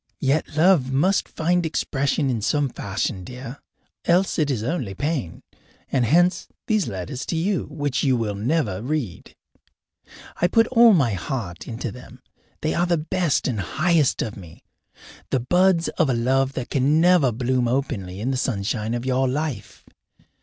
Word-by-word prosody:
Yet 145 +2 0
love 160 -6 +4
must 180 +9 +1
find 175 +2 0
expression 140 -3 0
in 115 -3 -2
some 140 +6 +1
fashion, 95 -3 -3
dear, 125 +6 -8 0.5
else 180 +1 +2
it 150 -2 +1
is 120 -6 -1
only 125 - -3
pain, 140 - -3 0.5
and 130 -3 +2
hence 175 - +3 0.2
these 215 -3 +1
letters 100 +8 -5
to - - -2
you 180 +2 0
which 145 -3 -2
you 130 -3 +3
will 110 -3 -2
never 110 - -1
read. 130 - -4 1.0
I 175 - +2
put 225 +4 +4
all 235 -2 +7
my 135 - +2
heart 95 -2 -5
into 115 0 -4
them; 125 +1 -13 0.4
they 155 - 0
are 175 +1 +1
the 170 -1 +2
best 160 0 0
and 120 -6 -2
highest 155 - +1
of 110 - -5
me, 85 -5 -13 0.7
the 130 - +1
buds 175 +6 +2
of 140 - 0
a 125 - +2
love 130 +3 +1
that 130 -2 -5
can 140 +3 +2
never 170 -6 +4
bloom 125 +1 0
openly 115 -8 -2
in 125 +5 -1
the 130 - -1
sunshine 110 -1 -1
of 120 +1 -4
your 130 0 +1
life. 130 -5 -4
135 Hz, 165 wpm, -23 LUFS, 115-160 Hz, 1.0 s, all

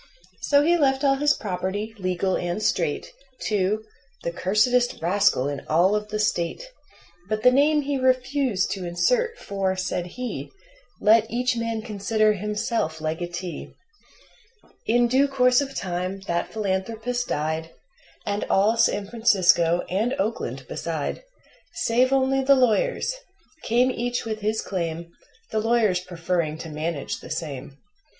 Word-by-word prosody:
So 285 0 +4
he 345 +3 +4
left 270 -1 +2
all 275 -1 +4
his 295 +1 +3
property, 200 +3 -3
legal 185 0 0
and 175 +4 -2
straight, 160 -4 0 0.4
To 210 +1 +1 0.4
"the 170 - -1
cursedest 215 +8 +2
rascal 175 -6 +2
in 145 -1 -3
all 175 +6 +3
of 210 0 -2
the 210 0 -3
State." 205 - -1 0.7
But 215 0 -2
the 250 - +7
name 295 +3 +3
he 280 -1 -1
refused 255 -4 +1
to 190 - -3
insert, 465 - +1
for, 195 -1 -2
said 180 -1 -2
he: 250 -2 -4 0.5
"Let 220 +1 +4
each 250 +1 0
man 230 -1 -2
consider 215 +1 +1
himself 210 -4 -2
legatee." 170 +2 -5 1.1
In 240 +2 +4
due 265 +4 +3
course 250 -1 +3
of 275 -1 -5
time 185 +1 -3
that 175 -3 -2
philanthropist 220 +4 -2
died, 160 +2 -2 0.6
And 205 0 -1
all 210 +4 +3
San 205 -3 +2
Francisco, 185 -6 +3
and 220 +8 0
Oakland 215 +4 -3
beside - - -3 0.5
Save 255 -5 +2
only 270 0 +2
the 275 +1 +6
lawyers 265 - +1 0.4
came 245 +3 +2
each 245 -1 -2
with 220 -1 -3
his 215 +1 -1
claim, 170 -2 -4 0.4
The 220 - 0
lawyers 220 -4 +2
preferring 170 -3 -2
to 165 - -7
manage 155 -1 -3
the - - -11
same. 140 -3 -5
210 Hz, 140 wpm, -24 LUFS, 180-250 Hz, 1.1 s, the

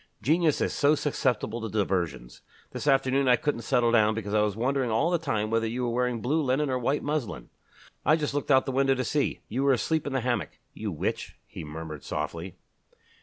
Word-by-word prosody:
Genius 155 +5 +2
is - - 0
so 145 +1 +3
susceptible 120 -6 -1
to 110 - -4
diversions. 85 - -2 0.3
This - - -5
afternoon 135 0 +3
I 125 - +6
couldn't 125 0 -2
settle 120 0 +2
down 110 -2 +4
because 105 -2 -4
I 105 - +4
was 105 -2 0
wondering 130 +2 0
all 115 +10 +1
the 175 - +2
time 110 -9 -1
whether 115 0 +1
you 120 +3 -3
were 120 - 0
wearing 125 -1 0
blue 150 +7 +1
linen 135 +1 +1
or 130 - 0
white 135 +4 0
muslin. 145 -6 -3 0.5
I 155 - +5
just 150 -3 -2
looked 145 +1 -2
out 130 -2 +5
of - - -21
the 135 - -2
window 135 0 +2
to 130 - -1
see 145 +4 -1
you 125 +5 -2
were 140 0 +4
asleep 155 +5 0
in 140 - -3
the 130 - 0
hammock... 120 - -2 0.2
you 105 -2 -4
witch!" 80 - -3
he - - -9
murmured 75 -1 -7
softly. 80 +4 -4
125 Hz, 220 wpm, -27 LUFS, 105-140 Hz, 0.5 s, I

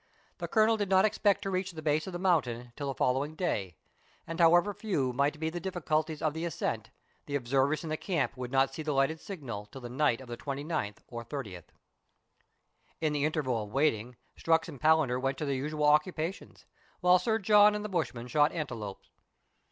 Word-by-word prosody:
The - - -3
Colonel 220 0 +3
did 205 -2 -2
not 190 +1 +5
expect 205 -1 +2
to 195 - -2
reach 185 0 -2
the 160 - -7
base 155 +2 +1
of 190 - -6
the - - -2
mountain 125 -10 0
till 145 -1 -4
the 135 - -3
following 135 +5 0
day, 100 - -2 0.5
and 165 +1 -6
however 175 +4 +5
few 150 - -1
might 140 +4 0
be 160 0 -1
the 175 +1 -5
diffi 180 -2 -5
culties 155 0 0
of 155 -2 +1
the 160 +1 -4
ascent, 170 -4 -3 0.4
the 145 - -3
observers 135 +4 +1
in 160 - -5
the 155 - -1
camp 165 -8 -1
would 125 -1 -6
not 135 0 +2
see 155 - -5
the 155 -1 -1
lighted 135 +4 +1
signal 125 - -7
till 130 +5 -11
the 120 - -7
night 130 -1 +1
of 130 - -11
the 120 0 -6
29th 140 -5 -4
or 120 -1 -6
30th. 105 - -7 1.3
In 155 -2 0
the 145 -1 +1
interval 140 -7 0
of - - -12
waiting, 125 -4 +1 0.2
Strux 165 0 +2
and 135 - -10
Palander 155 -5 +3
went 135 0 -1
to 150 - -3
their 140 - 0
usual 150 +3 -1
occupations, 160 +4 0 0.4
while 180 0 +6
Sir 220 +4 +1
John 210 0 +6
and 210 0 -3
the - - -1
bushman 155 - -2
shot 150 +4 +3
antelopes. 115 - -6
150 Hz, 205 wpm, -30 LUFS, 130-175 Hz, 1.3 s, while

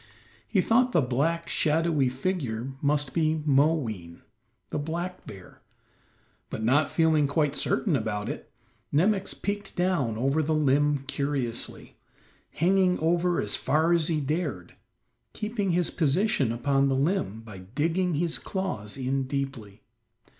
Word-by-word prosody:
He 195 - +2
thought 250 +5 +3
the 170 - +4
black, 155 +7 0
shadowy 155 -3 +2
figure 130 -4 -3
must 145 -1 0
be 155 -2 +1
Moween, 135 - +1 0.5
the - - -1
black 170 +4 -4
bear, 95 -3 -12 0.9
but 110 - -5
not 140 +6 +3
feeling 160 -3 +3
quite 145 0 +1
certain - - +1
about 105 0 -2
it, - - -6 0.4
Nemox 195 +6 +1
peeked 205 0 -4
down 175 -12 0
over 135 +6 +1
the 155 +1 0
limb 145 -1 +2
curiously, 135 -5 -2 0.5
hanging 185 +2 +2
over 170 +2 +1
as - - 0
far 160 +4 +2
as 165 -2 +2
he 160 -2 +1
dared, 145 - -3 0.6
keeping 210 -2 -2
his 175 -1 +1
position 155 - +1
upon 135 +3 +1
the 135 - +1
limb 140 - 0
by 105 -4 -10
digging 160 - -1
his 165 +2 -1
claws 140 - -4
in 135 +1 -1
deeply. 130 -7 -5
150 Hz, 130 wpm, -27 LUFS, 130-170 Hz, 0.9 s, the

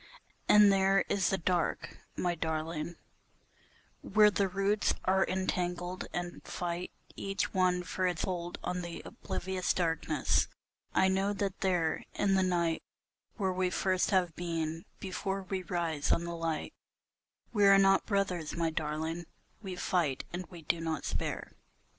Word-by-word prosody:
And 210 -1 +8
there 195 0 +3
is 195 -4 +2
the 195 - +1
dark, 175 0 -1 0.2
my 175 -1 0
darling, 160 0 -3 1.1
where 210 +1 +5
the 195 +1 +2
roots 195 +2 +1
are 190 +1 +4
entangled 180 -1 -2
and 175 0 -4
fight 175 0 -3 0.3
Each 195 0 -2
one 180 -2 +2
for 185 +1 -1
its 175 -3 -1
hold 175 -2 -3
on 180 0 -2
the 175 -1 -6
oblivious 185 0 -2
darkness, 165 -4 +1 0.4
I 190 - +4
know 195 +2 +1
that 195 -1 -3
there 175 -4 +1
In 200 -1 +2
the 190 - +4
night 170 -3 +1 0.5
where 190 -4 0
we 185 0 +1
first 185 0 +1
have 180 -5 +2
being, 165 -1 -3
before 195 +1 -3
we 190 0 -3
rise 170 -4 -1
on 170 - +2
the 170 0 -4
light, 165 -2 -2 0.8
We 205 -3 +5
are 195 0 +8
not 195 0 +4
brothers, 185 -6 0
my 165 -1 +1
darling, 160 +2 -3 0.3
we 190 -3 -5
fight 165 -7 0
and 180 0 -4
we 170 -2 -11
do 165 +2 0
not 160 -2 -2
spare. - - -3
180 Hz, 145 wpm, -32 LUFS, 170-190 Hz, 1.1 s, And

